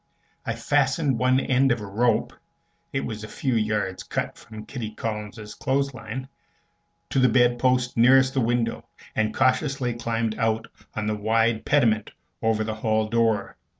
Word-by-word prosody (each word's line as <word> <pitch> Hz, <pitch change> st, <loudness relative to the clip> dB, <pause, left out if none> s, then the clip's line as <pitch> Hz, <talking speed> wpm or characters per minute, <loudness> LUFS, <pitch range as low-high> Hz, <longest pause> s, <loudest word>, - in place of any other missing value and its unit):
I 110 Hz, -, -1 dB
fastened 140 Hz, +2 st, +1 dB
one 130 Hz, +1 st, +3 dB
end 135 Hz, 0 st, +2 dB
of 120 Hz, -, +1 dB
a 105 Hz, -, -6 dB
rope 110 Hz, +3 st, +1 dB, 0.6 s
(it 135 Hz, -, -1 dB
was 110 Hz, -2 st, -5 dB
a -, -, -6 dB
few 130 Hz, +3 st, -2 dB
yards 105 Hz, -4 st, 0 dB
cut -, -, -3 dB
from 110 Hz, 0 st, -11 dB
Kitty 110 Hz, -5 st, -6 dB
Collins's 105 Hz, -1 st, -5 dB
clothes 140 Hz, +4 st, -1 dB
line) 125 Hz, +2 st, -6 dB, 0.8 s
to -, -, +2 dB
the 130 Hz, -1 st, +5 dB
bedpost 125 Hz, +1 st, +2 dB
nearest 130 Hz, +3 st, +5 dB
the 135 Hz, -, +1 dB
window, 115 Hz, 0 st, -1 dB, 0.3 s
and 110 Hz, 0 st, +1 dB
cautiously 130 Hz, 0 st, +1 dB
climbed 115 Hz, -1 st, -2 dB
out 115 Hz, 0 st, +1 dB, 0.3 s
on 110 Hz, -, -2 dB
the 105 Hz, 0 st, 0 dB
wide 110 Hz, +1 st, +1 dB
pediment 115 Hz, -7 st, +2 dB, 0.3 s
over 110 Hz, -1 st, +1 dB
the 110 Hz, 0 st, -3 dB
hall 110 Hz, 0 st, 0 dB
door. 110 Hz, -3 st, +1 dB
115 Hz, 155 wpm, -25 LUFS, 110-130 Hz, 0.8 s, the